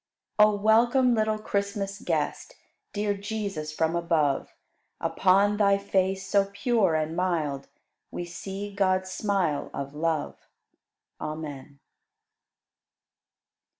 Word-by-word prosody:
99. 210 -1 +6
O - - -11
welcome, 240 +3 +4
little 215 -1 +1
Christmas 200 -1 -2
Guest, - - -2 0.4
Dear 205 0 0
Jesus, 200 -6 -4
from 160 +2 0
above; 165 -5 +1 0.5
Upon 200 +2 +3
Thy 200 -1 +4
face, 190 -1 0
so 200 -1 +2
pure 200 -5 +2
and 155 +1 -1
mild, 160 -7 -1 0.4
We 175 - -5
see 195 +4 -6
God's 185 -1 +1
smile 190 -7 0
of 140 0 -5
love. 155 0 -2 0.7
Amen. 145 -3 -7
195 Hz, 105 wpm, -27 LUFS, 160-205 Hz, 0.7 s, 99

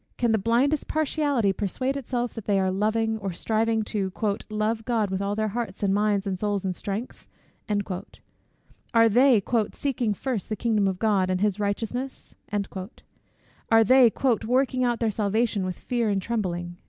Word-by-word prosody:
Can 240 -2 +2
the 220 - +2
blindest 250 +8 +1
partiality 285 -8 +1
persuade 255 +8 -2
itself 245 -3 -2
that 225 -3 -8
they 200 -2 +2
are 190 -1 +1
loving, 220 +3 0
or 195 -2 -3
striving 220 +4 0
"to 200 -3 -2 0.4
love 215 +1 -1
God 220 -4 0
with 190 0 -1
all 200 +1 -1
their 215 0 0
hearts, 215 -3 -4
and 195 -1 +2
minds, 205 -1 +1
and 190 -2 -2
souls, 205 -1 -1
and 185 - 0
strength?" 205 +7 -6 1.7
Are 230 0 +7
they 240 -1 +5 0.3
"seeking 245 -6 -1
first 245 -2 -3
the 215 - -1
kingdom 215 -3 +1
of 190 -1 -1
God, 200 -3 +2
and 185 0 0
his 205 0 0
righteousness?" 225 +6 -3 1.4
Are 225 0 +7
they 255 +1 +6 0.3
"working 255 +2 +1
out 240 -1 +1
their 225 -2 +1
salvation 210 0 0
with 180 - -4
fear 240 -3 -1
and 200 -1 +1
trembling?" 175 -5 -3
220 Hz, 165 wpm, -25 LUFS, 200-240 Hz, 1.7 s, Are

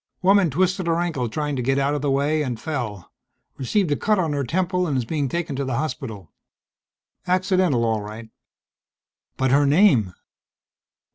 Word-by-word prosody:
"Woman 195 -2 +5
twisted 185 +4 0
her 165 0 +1
ankle 155 -9 -1
trying 150 +4 -2
to - - -1
get 135 +2 +1
out 140 +1 +1
of 145 - -2
the 145 - 0
way, 145 +3 +1
and 125 -6 -3
fell. 120 - -5 0.5
Received 165 - 0
a - - +3
cut 215 +7 +1
on 165 -5 0
her 140 -1 -1
temple 180 +6 0
and 140 -4 0
is 125 - -1
being 145 +1 -2
taken 170 -3 -3
to 140 - -1
the 130 -3 -2
hospital. 125 - -5 1.0
Accidental 185 -8 +2
all 110 -2 0
right." 110 +2 -9 1.1
"But 130 -1 +1
her 140 +1 +4
name." 140 - +4
145 Hz, 170 wpm, -23 LUFS, 125-175 Hz, 1.1 s, Woman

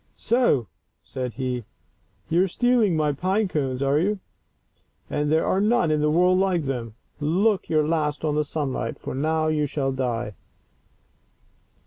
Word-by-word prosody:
" - - -40
So," 235 - +2 0.4
said 125 -2 -5
he, 125 -1 -3 0.3
" - - -40
you 170 +2 +4
are 190 - +3
stealing 230 -3 +2
my 150 -1 +2
pine 190 +8 0
cones, 135 -6 -2
are 140 +2 +2
you? 200 +4 0 0.9
And 150 0 0
there 160 +1 +3
are 190 - +1
none 215 -6 +2
in 150 -1 +1
the 150 - +2
world 180 +3 +4
like 185 -4 +1
them. 120 -5 -4 0.2
Look 185 +7 +1
your 155 -2 +2
last 155 -2 -1
on 150 - +1
the 150 0 +1
sunlight, 145 -3 -3
for - - -6
now 155 +4 0
you 150 -1 +1
shall 135 -1 -1
die." 120 -4 -2
155 Hz, 165 wpm, -24 LUFS, 135-185 Hz, 0.9 s, you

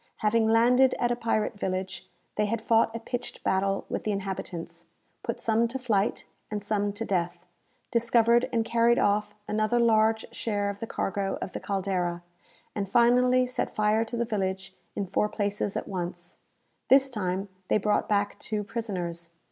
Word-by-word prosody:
Having 220 +1 +2
landed 245 +4 +5
at 240 0 +1
a - - +2
pirate 225 -3 -1
village, 185 0 -3 0.3
they 210 0 +1
had 230 +2 -1
fought 225 0 +2
a - - -3
pitched 245 +1 -6
battle 195 +1 +1
with - - -3
the 215 - 0
inhabitants; 175 -4 -5 0.3
put 235 - -4
some 230 +1 +2
to 245 +3 -4
flight, 220 -6 0 0.2
and 210 -1 -4
some 205 -1 0
to 225 +2 -4
death; 175 -3 -2 0.5
discovered 235 0 +3
and 230 -2 +1
carried 235 +1 +3
off 210 0 +1
another 215 +3 +1
large 220 -1 +3
share 205 -2 -1
of 200 - -11
the 230 - -5
cargo 195 -1 -2
of - - -5
the - - -4
"Caldera;" 180 -3 -2 0.5
and 200 -2 -3
finally 250 +2 +4
set 250 0 -3
fire 215 +1 +3
to 235 +1 -5
the 235 - 0
village 195 -3 -2 0.2
in 200 - -1
four 210 +3 0
places 205 -1 -2
at - - -4
once. 175 -2 -5 0.5
This 270 0 +6
time 195 -5 -2 0.2
they - - +3
brought 210 0 +1
back 205 -1 0
two 210 -1 -3
prisoners. 180 -7 -4
210 Hz, 170 wpm, -27 LUFS, 195-230 Hz, 0.5 s, This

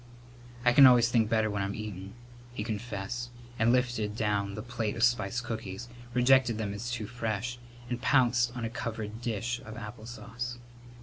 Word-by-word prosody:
"I 120 - +6
can 135 +1 +10
always 120 -2 +6
think 115 -3 +3
better 110 -1 +3
when 100 -1 -2
I'm 100 +1 -2
eatin'," 100 -3 -6 0.4
he 105 - -2
confessed, 115 +1 -4 0.3
and 115 +2 +4
lifted 120 -4 +1
down 100 -2 0
the 105 - -5
plate 120 -3 -2
of 115 - -1
spiced 120 -1 +2
cookies, 110 -1 -5 0.3
rejected 125 -2 +5
them 105 -2 -2
as 110 +4 -4
too 120 -3 -3
fresh, 115 +1 -3 0.3
and 120 0 -3
pounced 120 -3 +3
on 120 - -2
a - - -2
covered 110 -2 -5
dish 120 +1 -2
of 110 +1 -9
apple 110 0 -8
sauce. 120 0 -6
115 Hz, 175 wpm, -30 LUFS, 105-120 Hz, 0.4 s, can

